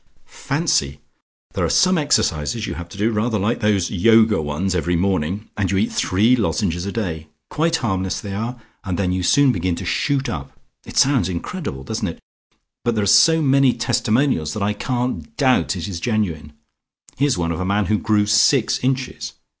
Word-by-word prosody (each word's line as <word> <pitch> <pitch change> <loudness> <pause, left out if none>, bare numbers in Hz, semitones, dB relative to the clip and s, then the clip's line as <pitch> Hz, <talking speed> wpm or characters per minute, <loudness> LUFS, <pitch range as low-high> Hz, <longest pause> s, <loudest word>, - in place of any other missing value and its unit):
Fancy! 70 0 -1 0.5
There - - -2
are - - +1
some 185 0 +3
exercises 115 - 0
you - - -4
have 85 0 -8
to 90 - -11
do, 110 +3 +1
rather 110 +1 0
like 105 +4 -1
those 105 -5 +1
Yoga 110 0 +4
ones, 80 +6 -2
every 90 0 0
morning, 95 +2 -1
and 100 -3 -1
you 95 - 0
eat 105 +4 0
three 110 +7 +2
lozenges 100 -6 -1
a - - -3
day. 80 -8 -4 0.2
Quite 165 +2 +1
harmless 95 -9 -2
they 100 -2 -6
are, 115 +5 -4 0.2
and 90 -4 -3
then 95 -2 0
you 90 0 -1
soon 140 +9 +4
begin 90 -4 -1
to - - -7
shoot 140 -2 0
up. 70 -3 -6 0.3
It - - -8
sounds 130 -10 +3
incredible, 90 - -5
doesn't - - -3
it? - - -6 0.6
but 120 -1 0
there 105 - 0
are - - 0
so 160 - +5
many 135 -2 +4
testimonials 110 - 0
that 105 - -2
I 105 +1 0
can't 125 - -3
doubt 130 -7 +2
it 85 -3 -5
is 90 -4 -5
genuine. 85 -9 -2 0.6
Here's 140 -5 +1
one 85 -1 -1
of 85 - -3
a - - -1
man 100 +2 0
who 105 -1 +1
grew 105 -2 +1
six 105 +4 +3
inches. 130 0 -2
105 Hz, 190 wpm, -20 LUFS, 90-125 Hz, 0.6 s, so